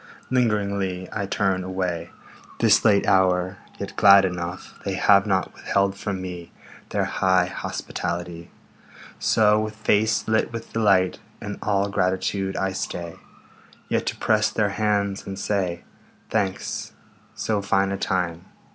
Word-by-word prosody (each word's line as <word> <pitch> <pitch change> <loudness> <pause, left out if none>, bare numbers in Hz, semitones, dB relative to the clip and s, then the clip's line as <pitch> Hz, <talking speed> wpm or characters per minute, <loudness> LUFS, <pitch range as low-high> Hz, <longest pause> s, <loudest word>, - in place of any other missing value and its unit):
Lingeringly 100 -6 0
I 100 -2 -3
turn 95 -2 0
away, 90 -2 -3 0.5
This - - +4
late 100 -2 +4
hour, 95 0 +2 0.2
yet - - -6
glad 100 -1 +7
enough 90 0 -5
They 100 -1 -2
have 100 +2 +4
not 95 -2 0
withheld 100 0 0
from 100 -1 -4
me 90 -2 -7 0.4
Their - - 0
high 95 -1 +2
hospitality. 85 -1 -5 0.7
So, 105 -1 +4
with 110 0 -3
face 110 0 +1
lit 110 +1 +1
with 115 -1 -7
delight 100 -5 +3 0.2
And 105 0 -6
all 100 -1 +1
gratitude, 95 +1 -1
I 95 0 0
stay 85 -3 -5 0.7
Yet - - 0
to - - -1
press 110 -1 +2
their 105 -2 0
hands 100 -1 -1
and 95 -1 -5
say, 95 -4 -1 0.5
"Thanks. 95 -1 -2 0.4
So 105 -2 -1
fine 95 0 +1
a 100 - -2
time 90 -2 -1
95 Hz, 135 wpm, -24 LUFS, 90-105 Hz, 0.7 s, glad